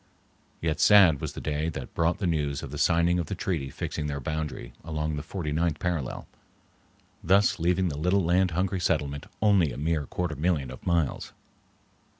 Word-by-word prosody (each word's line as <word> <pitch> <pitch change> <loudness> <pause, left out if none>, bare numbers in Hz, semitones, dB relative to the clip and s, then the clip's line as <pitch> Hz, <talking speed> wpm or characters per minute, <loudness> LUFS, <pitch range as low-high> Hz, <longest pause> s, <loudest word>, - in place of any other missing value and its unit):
Yet 80 -2 -1
sad 95 -8 +6
was - - -4
the - - -7
day 75 +1 -2
that 70 -5 -7
brought 85 +2 +1
the 100 - -3
news 75 -5 -1
of 70 - -7
the 75 - -5
signing 85 +1 +3
of 85 - -2
the 100 - -3
treaty 85 -7 -2
fixing 75 +4 -4
their 70 -1 -3
boundary 75 -4 -4
along 75 -1 -2
the 75 - -3
forty 80 0 -4
ninth 80 0 0
parallel, 80 -6 -3 1.0
thus 95 +2 +3
leaving 90 +2 +1
the 75 -2 -5
little 90 +4 +2
land 90 +2 +3
hungry 95 +3 -1
settlement 70 -4 -1 0.2
only 100 -8 +4
a - - -7
mere 75 -1 -1
quarter 90 -3 -3
million 75 -4 0
of - - -11
miles! 85 -5 0
80 Hz, 180 wpm, -27 LUFS, 75-90 Hz, 1.0 s, sad